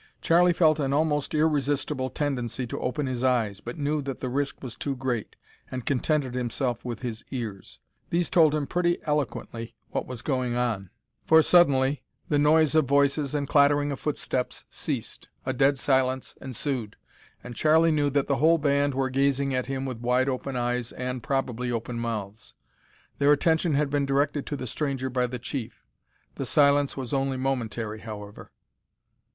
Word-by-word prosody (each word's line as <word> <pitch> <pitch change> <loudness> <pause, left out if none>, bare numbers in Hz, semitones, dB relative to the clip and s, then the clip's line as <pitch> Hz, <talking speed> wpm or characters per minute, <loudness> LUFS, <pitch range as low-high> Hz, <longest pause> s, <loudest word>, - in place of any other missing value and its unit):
Charlie 175 +2 +4
felt 160 -3 +3
an 135 -2 0
almost 150 0 +1
irresistible 145 -3 +1
tendency 125 -4 -2
to 115 - -5
open 145 +3 -2
his 130 -1 -3
eyes, 115 -6 +1
but 120 - -7
knew 150 0 0
that 135 -2 -5
the 130 - -3
risk 140 +2 -2
was 120 -3 -6
too 140 -2 -3
great, 125 -4 -3 0.3
and 130 -2 -5
contented 140 -1 0
himself 125 0 -2
with 120 0 -6
his 115 -3 -4
ears. 110 -7 -6 0.3
These 170 0 +1
told 155 -3 +4
him 150 -2 -1
pretty 175 +2 +1
eloquently 135 -6 -3 0.2
what - - -2
was 125 -3 -7
going 130 -4 -1
on, 115 -6 -1 0.4
for 160 0 +7
suddenly, 140 -6 +4 0.3
the 145 - +3
noise 155 0 +4
of 155 -2 +4
voices 140 +1 +2
and 140 -1 -1
clattering 145 0 +4
of 140 - -4
footsteps 130 -4 -3
ceased, - - -5 0.2
a 130 - 0
dead 135 +2 +3
silence 130 -1 +1
ensued, 130 -4 -3 0.5
and 120 -1 -8
Charlie 160 +3 +4
knew 145 -2 +2
that 140 0 +1
the 140 - 0
whole 165 +2 +5
band 140 -2 +1
were 135 -1 0
gazing 140 0 +1
at 125 -1 -1
him 135 0 -3
with 130 -4 -5
wide 125 +2 +2
open 135 0 -3
eyes 120 -1 -1
and, 125 0 -4
probably, 125 -2 -1
open 115 0 -3
mouths. 105 -2 -5 0.6
Their 145 +1 +5
attention 160 +1 +2
had 145 -1 +1
been 145 -1 +1
directed 140 +1 0
to 145 - -2
the 130 - -5
stranger 130 0 -2
by 125 0 +1
the 125 +1 -5
chief. 120 0 -6 0.5
The - - -3
silence 145 -1 +3
was 130 0 -4
only 135 -1 0
momentary, 115 -5 -2
however. 105 -2 -9
135 Hz, 170 wpm, -26 LUFS, 125-145 Hz, 0.6 s, for